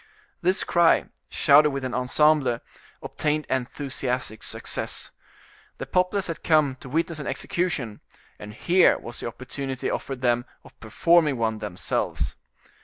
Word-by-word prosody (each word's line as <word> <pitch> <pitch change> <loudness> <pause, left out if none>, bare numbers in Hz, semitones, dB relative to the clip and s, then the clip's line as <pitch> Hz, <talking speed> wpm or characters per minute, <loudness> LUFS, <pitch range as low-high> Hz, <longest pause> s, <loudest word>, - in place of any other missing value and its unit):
This 185 +2 +1
cry, 170 -1 +4 0.2
shouted 150 0 +5
with 140 -1 -4
an 130 -1 -3
ensemble, 130 0 +2 0.4
obtained 150 -1 -1
enthusiastic 130 -3 -3
success. - - -3 0.7
The - - -5
populace 185 +2 +1
had 165 -2 -6
come 155 -4 +3
to 130 - -11
witness 165 +2 -1
an 145 - -5
execution, 145 - -2 0.4
and 105 +1 -9
here 180 +1 +4
was 120 - -8
an - - -3
opportunity 130 +2 -4
offered 135 -2 -4
them 120 -1 +1 0.2
of - - -18
performing 150 +6 +3
one 110 -1 -1
themselves. 105 -4 -2
135 Hz, 130 wpm, -25 LUFS, 120-155 Hz, 0.7 s, shouted